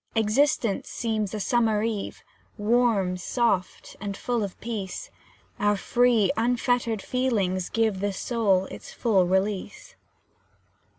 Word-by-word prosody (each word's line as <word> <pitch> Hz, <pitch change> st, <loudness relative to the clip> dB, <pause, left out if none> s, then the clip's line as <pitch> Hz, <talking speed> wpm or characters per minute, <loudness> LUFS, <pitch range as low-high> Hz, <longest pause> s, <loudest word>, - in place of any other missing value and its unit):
Existence 225 Hz, -1 st, +1 dB
seems 215 Hz, -4 st, -2 dB
a 215 Hz, -, -4 dB
summer 220 Hz, -1 st, +2 dB
eve, 220 Hz, -3 st, -3 dB, 0.3 s
Warm, 210 Hz, -4 st, +2 dB
soft, 195 Hz, -1 st, -1 dB
and 200 Hz, -1 st, -4 dB
full 240 Hz, -2 st, -1 dB
of 195 Hz, -3 st, -6 dB
peace, 225 Hz, -, -5 dB, 0.5 s
Our 205 Hz, 0 st, +2 dB
free, 240 Hz, -2 st, +3 dB
unfettered 235 Hz, -2 st, 0 dB
feelings 200 Hz, -8 st, 0 dB
give 220 Hz, -4 st, +1 dB
The 205 Hz, +1 st, 0 dB
soul 195 Hz, -2 st, +1 dB
its -, -, -9 dB
full 195 Hz, -7 st, +2 dB
release. 190 Hz, +2 st, -1 dB
215 Hz, 115 wpm, -26 LUFS, 195-235 Hz, 0.5 s, free